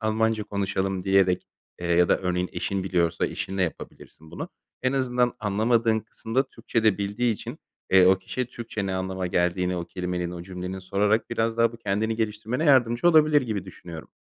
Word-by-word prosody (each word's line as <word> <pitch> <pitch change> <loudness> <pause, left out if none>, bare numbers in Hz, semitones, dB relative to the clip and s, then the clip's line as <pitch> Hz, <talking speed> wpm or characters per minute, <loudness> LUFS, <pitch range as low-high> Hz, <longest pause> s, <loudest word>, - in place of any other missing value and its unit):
Almanca 110 0 +1
konuşalım." 95 -2 -2
diyerek, 95 -2 +2 0.4
ııı, 85 - -2
ya 85 0 +4
da - - +3
örneğin, 90 0 -1
eşin 100 -1 -2
biliyorsa, 85 -3 +1
eşinle 95 0 -3
yapabilirsin 80 -1 -7
bunu. - - -6 0.3
En 130 +1 +1
azından 125 -2 +1
anlamadığın 110 +2 +2
kısımda 115 +3 -2
Türkçe 115 -2 -2
de 105 -2 +4
bildiği 105 +4 0
için, - - -8 0.3
eee, 95 -1 +7
o 95 0 +5
kişiye 125 +6 -4
Türkçe 115 -4 -5
ne 95 - -2
anlama 95 0 -2
geldiğini 90 +1 0
o 85 - -3
kelimenin, 90 -1 -3
o 85 -1 -7
cümlenin, 90 +1 -6
sorarak 105 +5 0
biraz 115 0 0
daha 115 0 +3
bu - - -9
kendini 110 +1 -1
geliştirmene 110 +6 -2
yardımcı 130 +1 +4
olabilir 155 -3 +5
gibi 105 -6 -3
düşünüyorum. 85 -3 -10
100 Hz, 175 wpm, -25 LUFS, 90-115 Hz, 0.4 s, eee